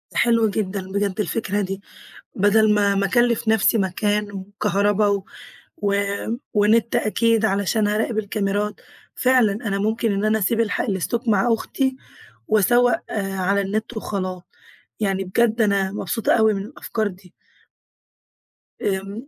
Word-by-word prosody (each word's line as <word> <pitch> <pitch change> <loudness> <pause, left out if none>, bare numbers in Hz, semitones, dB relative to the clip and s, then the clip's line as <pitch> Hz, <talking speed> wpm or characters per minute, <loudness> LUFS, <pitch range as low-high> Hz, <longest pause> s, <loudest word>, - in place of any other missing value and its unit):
حلو 230 -2 +3
جدًا 195 -2 -3
بجد 200 0 -1
الفكرة 205 -1 -1
دي، 195 0 -4 0.5
بَدَل 210 +2 +4
ما 200 -1 +2
ما 195 0 +1
أكلِّف 240 +2 +1
نَفْسي 220 +1 +3
مكان 205 +2 -1
وكهربا 205 +1 0
و 200 -1 0 0.5
و 200 -10 0 0.6
ونِت 220 +3 +3
أكيد 230 0 +1
علشان 205 +1 +1
هاراقب 220 +2 -1
الكاميرات، 205 0 -2 0.3
فعلًا 250 -5 +3
أنا 205 -2 -3
ممكن 220 +2 0
إن 200 +1 -1
أنا 215 +1 +2
أسيب 225 +3 +1
الحا 225 -3 0
الاستوك 225 +5 -2
مع 220 +2 +3
أختي 265 +3 -1 0.5
وأسوَّق 240 +4 +3 0.2
على 195 0 0
النت 215 +4 -3
وخلاص. 185 -4 -4 0.6
يعني 195 -2 0
بجد 225 +4 +1
أنا 200 -3 +1
مبسوطة 215 +2 -1
أوي 220 -1 +4
من 195 - -3
الأفكار 220 -2 -3
دي. 185 -2 -11 1.5
آمم، 200 +5 -3
210 Hz, 130 wpm, -22 LUFS, 195-225 Hz, 1.5 s, بَدَل